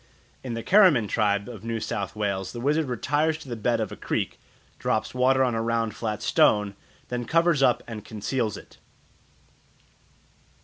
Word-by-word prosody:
In 125 -3 -4
the 115 - -5
Keramin 180 - +5
tribe 100 0 +1
of 115 -4 -9
New 115 0 -2
South 100 -1 -4
Wales 100 -3 -2
the 120 - -6
wizard 150 +4 +1
retires 145 +6 0
to 160 - -13
the 120 - -4
bed 115 +1 0
of 110 -3 -2
a - - -6
creek, - - -3 0.4
drops 110 0 -1
water 130 +1 +3
on 125 -2 +1
a 115 - -1
round 115 -2 -1
flat 110 -2 -3
stone, 105 -1 +3 0.4
then 125 0 -2
covers 165 0 +2
up 125 -3 +3
and 110 -3 -7
conceals 110 +1 -2
it. - - -15
115 Hz, 170 wpm, -25 LUFS, 105-130 Hz, 0.4 s, Keramin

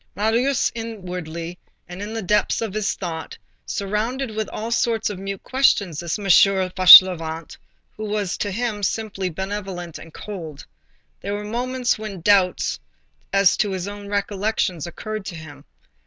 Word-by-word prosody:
Marius, 235 +6 +1
inwardly, 180 -7 -6 0.3
and 180 +2 -8
in 205 +1 -5
the 225 - -3
depths 210 +3 +1
of 225 -4 -3
his 215 -1 -1
thought, 165 -4 -6 0.3
surrounded 220 +6 -2
with 220 0 -3
all 225 +2 -5
sorts 230 -3 +1
of 190 - -7
mute 195 0 -6
questions 200 - +2
this 170 +2 -2
M. 205 - -8
Fauchelevent, 185 -4 +6 0.4
who 215 - -6
was 205 -3 -2
to 205 - -2
him 215 0 -2
simply 200 -2 -2
benevolent 190 -1 -5
and 165 - -12
cold. 165 -7 -8 0.5
There 200 +1 -4
were 205 - -5
moments 245 +2 -1
when 210 -5 -7
doubts 190 -1 +2 0.5
as 195 -1 +4
to 210 - +1
his 185 0 -4
own 205 0 -8
recollections 200 -4 -1
occurred 215 +4 -6
to 180 - -6
him. 155 -2 -11
200 Hz, 150 wpm, -22 LUFS, 180-215 Hz, 0.5 s, Fauchelevent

